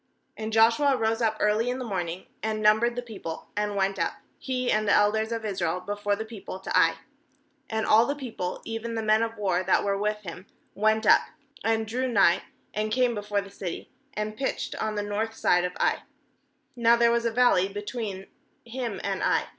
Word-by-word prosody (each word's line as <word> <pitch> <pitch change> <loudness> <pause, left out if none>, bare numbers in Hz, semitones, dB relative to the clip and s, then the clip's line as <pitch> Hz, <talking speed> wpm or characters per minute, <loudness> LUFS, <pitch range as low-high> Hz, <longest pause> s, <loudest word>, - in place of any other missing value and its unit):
10And 220 0 -3
Joshua 230 +5 +4
rose 225 +1 0
up 220 -1 +1
early 215 +3 +2
in 250 - -2
the 255 - -5
morning, 180 -4 -3 0.2
and 220 0 -2
numbered 220 +3 +3
the 245 - -3
people, 195 -8 -7
and 210 0 -1
went 195 0 0
up, - - 0 0.3
he 255 -1 -1
and 215 0 +1
the - - +4
elders 220 +2 +3
of 230 -1 -3
Israel, 180 -4 -1
before 205 +1 -2
the 220 +2 -5
people 220 -4 -8
to 190 - -4
Ai. 165 -3 +5 0.7
"And 220 0 -1
all 225 +2 +5
the 285 - -1
people, 225 -10 -5
even 225 +1 -4
the 225 - -2
men 215 +1 +3
of 230 0 -2
war 190 -3 +1
that 185 0 +2
were 200 -1 0
with 210 +1 0
him, 185 +1 -8 0.3
went 220 +1 +2
up, - - +7 0.4
and 225 0 +1
drew 250 +4 -2
nigh, 195 -6 +4 0.3
and 215 0 -2
came 250 +1 +2
before 205 -1 -1
the 200 0 -12
city, 185 -3 -6 0.2
and 210 0 -3
pitched 265 +4 -2
on 215 -1 -1
the 205 - -1
north 215 +2 -2
side 175 -4 +3
of 180 0 -3
Ai - - +2 0.4
— 280 0 -44
now 235 -1 +5
there 235 0 +4
was 235 0 +1
a 230 - +1
valley 225 -6 +4
between 205 -1 -5 0.4
him 235 -2 -4
and - - -2
Ai. - - +1
215 Hz, 205 wpm, -27 LUFS, 200-230 Hz, 0.7 s, up